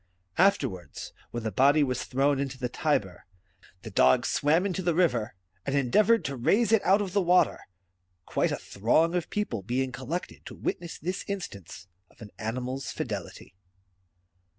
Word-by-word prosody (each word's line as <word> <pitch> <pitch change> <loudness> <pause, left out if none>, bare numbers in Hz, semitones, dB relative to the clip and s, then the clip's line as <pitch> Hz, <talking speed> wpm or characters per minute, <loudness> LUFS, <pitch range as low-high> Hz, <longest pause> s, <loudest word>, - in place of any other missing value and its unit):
After 195 -6 +4
wards, 90 - -9 0.2
when 120 -1 -5
the 110 - -2
body 140 +8 +4
was 130 -2 -2
thrown 140 +1 +1
into 135 -1 -3
the 125 -1 -2
Tiber, 120 - -1 0.6
the 110 - -8
dog 65 -8 +4
swam 160 +6 +2
into 190 -1 -1
the 175 -2 0
river, 125 -10 +1 0.3
and 140 - -2
endeavoured 210 - +3
to 140 - -2
raise 210 - +2
it 225 -3 +4
out 195 +3 +4
of 185 -3 -6
the 200 - +3
water; 180 0 +2 0.6
quite - - 0
a - - -1
throng 155 - +1
of 180 -2 -2
people 210 - -2
being 125 +6 -1
collected 135 +8 -5
to - - -8
witness 170 -1 -4
this 180 +4 -4
instance 100 - -6 0.2
of - - -26
an 105 -2 -11
animal's 125 +4 -3
fidelity. - - -6
140 Hz, 165 wpm, -28 LUFS, 120-180 Hz, 0.6 s, After